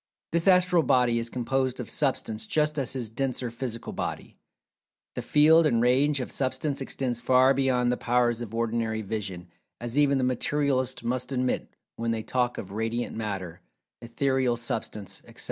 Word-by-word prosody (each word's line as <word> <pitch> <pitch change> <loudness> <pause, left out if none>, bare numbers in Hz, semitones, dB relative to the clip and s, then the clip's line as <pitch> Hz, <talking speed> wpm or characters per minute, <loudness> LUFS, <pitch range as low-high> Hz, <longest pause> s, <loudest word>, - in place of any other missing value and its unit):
This 170 +2 +1
Astral 180 -2 +5
Body 125 -5 +3
is 115 0 -2
composed 130 +1 -1
of 120 - -5
Substance 130 -7 -1
just 150 -1 +1
as 130 - 0
his 120 -5 -4
denser[Pg 125 -1 -2
220] - - -19
physical 115 -2 -4
body. - - -5 0.8
The - - -4
field 155 +2 +5
and 115 -5 +2
range 135 +4 +3
of - - -5
Substance 140 +1 -1
extends 125 -3 -2
far 130 +1 +5
beyond 125 -2 +2
the 125 - 0
powers 120 -1 +1
of 115 -1 -6
ordinary 115 -1 -1
vision, 95 -4 -5 0.3
as 120 +4 -1
even 140 -1 +4
the 130 - 0
Materialists 130 0 0
must 125 +2 -2
admit 125 -1 -1 0.3
when 115 0 -2
they 115 -1 -1
talk 125 0 0
of 95 - -7
"Radiant 115 +3 -2
Matter," 95 -5 -5 0.4
"Etherial 125 +1 0
Substance," 105 -4 -4
etc. 115 +2 -9
125 Hz, 165 wpm, -27 LUFS, 115-135 Hz, 0.8 s, Astral